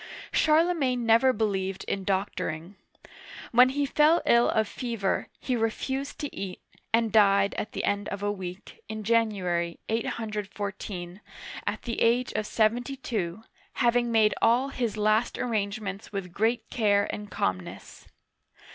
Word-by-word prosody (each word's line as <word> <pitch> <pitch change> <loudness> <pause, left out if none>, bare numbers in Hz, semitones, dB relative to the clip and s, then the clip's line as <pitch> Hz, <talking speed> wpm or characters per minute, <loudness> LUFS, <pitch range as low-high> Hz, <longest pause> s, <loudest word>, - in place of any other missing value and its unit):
Charlemagne 305 -6 +2
never 230 +4 +5
believed 195 -4 -1
in 195 - -3
doctoring. 190 -3 -2 0.8
When 250 +2 +7
he 285 +2 0
fell 305 +4 +4
ill 235 0 +5
of 220 -1 +1
fever, 230 -6 -2
he 255 - -1
refused 265 +5 -2
to 290 - -5
eat, 190 -2 -5 0.3
and 230 -1 +2
died 200 -2 +4
at 210 - -4
the - - -3
end 205 0 -1
of 200 0 -5
a 205 - +1
week, 185 -1 -8
in 220 0 -5
January, 195 -7 0
814, 205 -4 -4 0.5
at - - -2
the 235 -2 -3
age 240 +2 +2
of 215 - -2
seventy 240 +5 +1
two, 210 -6 -3 0.3
hav 240 -2 +2
ing 240 -1 +2
made 220 -2 +4
all 245 +4 +3
his 235 -6 -2
last 215 +2 +2
arrangements 205 -4 -3
with 190 -4 -5
great 225 +4 0
care 205 -3 +2
and 210 -1 -6
calmness. 95 - -4
215 Hz, 140 wpm, -27 LUFS, 200-240 Hz, 0.8 s, When